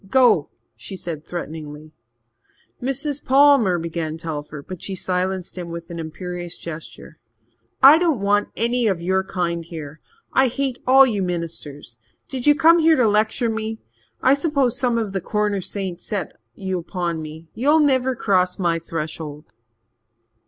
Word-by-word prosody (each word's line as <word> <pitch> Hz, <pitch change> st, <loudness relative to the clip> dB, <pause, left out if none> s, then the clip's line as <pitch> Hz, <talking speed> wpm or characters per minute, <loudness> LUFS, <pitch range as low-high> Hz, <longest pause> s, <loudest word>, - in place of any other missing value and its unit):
"Go!" 260 Hz, 0 st, +4 dB, 0.3 s
she 190 Hz, -, -8 dB
said 160 Hz, -4 st, -6 dB
threateningly. 155 Hz, -2 st, -7 dB, 0.9 s
"Mrs. 275 Hz, +3 st, -3 dB
Palmer," 265 Hz, -8 st, +5 dB
began 165 Hz, -1 st, -3 dB
Telford, 150 Hz, -3 st, -6 dB
but 185 Hz, -2 st, -7 dB
she 195 Hz, -, -3 dB
silenced 185 Hz, 0 st, -2 dB
him 175 Hz, -1 st, -6 dB
with 170 Hz, 0 st, -7 dB
an 170 Hz, -, -6 dB
imperious 175 Hz, +2 st, -6 dB
gesture. 155 Hz, -1 st, -9 dB, 0.6 s
"I 290 Hz, +4 st, +10 dB
don't 330 Hz, -8 st, +1 dB
want 205 Hz, +1 st, +1 dB
any 235 Hz, +1 st, +1 dB
of 190 Hz, -5 st, +1 dB
your 190 Hz, +2 st, +1 dB
kind 170 Hz, -3 st, -2 dB
here. 160 Hz, -2 st, -9 dB, 0.3 s
I 265 Hz, 0 st, +4 dB
hate 260 Hz, 0 st, -2 dB
all 270 Hz, +1 st, +8 dB
you 215 Hz, -6 st, -1 dB
ministers. 160 Hz, -8 st, -5 dB, 0.3 s
Did 260 Hz, 0 st, -3 dB
you 295 Hz, -, +7 dB
come 330 Hz, +2 st, +6 dB
here 325 Hz, 0 st, +5 dB
to 250 Hz, -5 st, +3 dB
lecture 220 Hz, +3 st, +2 dB
me? 220 Hz, 0 st, -3 dB, 0.5 s
I 260 Hz, -, +6 dB
suppose 280 Hz, -4 st, +1 dB
some 245 Hz, -2 st, +1 dB
of 215 Hz, -4 st, -2 dB
the 190 Hz, -, -2 dB
Corner 210 Hz, -1 st, -1 dB
saints 185 Hz, -2 st, -4 dB
set 200 Hz, -7 st, -4 dB, 0.2 s
you 190 Hz, -3 st, -3 dB
on 170 Hz, -3 st, -1 dB
me. 155 Hz, +1 st, -9 dB
You'll 290 Hz, +6 st, +3 dB
never 260 Hz, -3 st, +2 dB
cross 185 Hz, -5 st, +1 dB
my 170 Hz, -3 st, +1 dB
threshold." 155 Hz, -4 st, -6 dB
190 Hz, 150 wpm, -22 LUFS, 165-250 Hz, 0.9 s, I